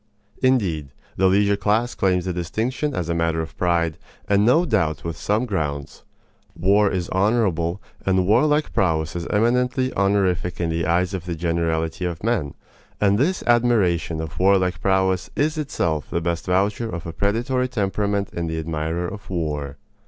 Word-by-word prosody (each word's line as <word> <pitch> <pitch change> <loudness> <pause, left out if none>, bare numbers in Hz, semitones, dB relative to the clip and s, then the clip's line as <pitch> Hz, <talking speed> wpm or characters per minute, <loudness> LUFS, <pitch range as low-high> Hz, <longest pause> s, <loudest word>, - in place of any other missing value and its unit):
Indeed, 90 - +1 0.2
the 95 - +3
leisure 100 +2 +3
class 105 +4 +1
claims 90 -2 +1
the 90 - -2
distinction 115 - -2
as 90 -2 -2
a 85 - 0
matter 85 -1 0
of 80 0 -5
pride, 85 -3 0 0.3
and 100 0 +3
no 130 +10 +4
doubt 80 - 0
with 85 -1 -4
some 105 +4 0
grounds. 75 - -3 0.6
War 100 +3 +3
is 90 -3 -2
honorable, 95 -4 +1 0.2
and 95 -1 +2
warlike 150 +9 +2
prowess 80 -4 0
is 85 -1 -4
eminently 125 +4 +1
honorific 95 -3 +1
in 85 -1 0
the 80 -1 -1
eyes 90 +2 +1
of 90 -3 -4
the 85 - -2
generality 85 +1 -1
of 85 -1 -4
men; 110 -11 -1 0.4
and 100 0 +3
this 175 +7 +1
admiration 105 -9 +2
of 80 -2 -7
warlike 95 -1 +2
prowess 95 -1 +1
is 155 +2 +1
itself 85 - -2
the 85 - -1
best 85 +1 -3
voucher 100 +5 +1
of 85 -5 -6
a 85 - -5
predatory 120 +7 0
temperament 100 -3 -1
in 85 -1 -3
the 80 0 -3
admirer 80 +2 -2
of 100 +3 -9
war. 75 -6 -3
95 Hz, 165 wpm, -22 LUFS, 85-105 Hz, 0.6 s, no